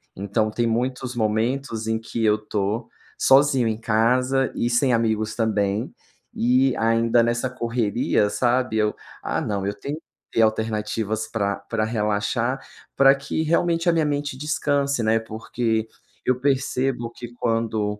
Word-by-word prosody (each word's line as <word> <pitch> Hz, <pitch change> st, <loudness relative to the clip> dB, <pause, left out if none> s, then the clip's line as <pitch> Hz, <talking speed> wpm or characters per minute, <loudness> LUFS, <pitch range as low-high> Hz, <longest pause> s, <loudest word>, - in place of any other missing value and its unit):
Então, 100 Hz, +3 st, -1 dB
tem 120 Hz, +2 st, 0 dB
muitos 125 Hz, +2 st, -2 dB
momentos 115 Hz, +1 st, -1 dB
em 110 Hz, 0 st, +1 dB
que 115 Hz, 0 st, -4 dB
eu 105 Hz, 0 st, +4 dB
tô 105 Hz, 0 st, -2 dB, 0.3 s
sozinho 135 Hz, -3 st, +4 dB
em 110 Hz, -, -1 dB
casa 125 Hz, +4 st, +2 dB
e 120 Hz, -, 0 dB
sem 120 Hz, +1 st, +2 dB
amigos 110 Hz, -1 st, 0 dB
também 105 Hz, -2 st, 0 dB, 0.4 s
e 125 Hz, +2 st, +2 dB
ainda 115 Hz, +1 st, +3 dB
nessa 120 Hz, +2 st, 0 dB
correria, 115 Hz, -4 st, 0 dB
sabe, 125 Hz, 0 st, +1 dB
eu 105 Hz, -1 st, +2 dB, 0.3 s
ah, -, -, -1 dB
não 100 Hz, -2 st, -2 dB
eu 100 Hz, -, -1 dB
tenho 145 Hz, +7 st, -5 dB, 0.3 s
ter 115 Hz, -, +2 dB
alternativas 110 Hz, 0 st, -1 dB
pra 100 Hz, -3 st, -1 dB
pra 115 Hz, -2 st, 0 dB
relaxar, 115 Hz, +4 st, -1 dB, 0.4 s
pra 135 Hz, 0 st, +6 dB
que 140 Hz, +3 st, -3 dB
realmente 170 Hz, +1 st, +1 dB
a 170 Hz, -, +4 dB
minha 160 Hz, -2 st, +2 dB
mente 145 Hz, -2 st, -2 dB
descanse, 140 Hz, -2 st, 0 dB
né, 110 Hz, +1 st, +3 dB
porque 110 Hz, 0 st, -2 dB, 0.4 s
eu 125 Hz, 0 st, +1 dB
percebo 130 Hz, -3 st, 0 dB
que 120 Hz, 0 st, -9 dB
quando 110 Hz, -3 st, -1 dB
115 Hz, 145 wpm, -23 LUFS, 110-130 Hz, 0.4 s, pra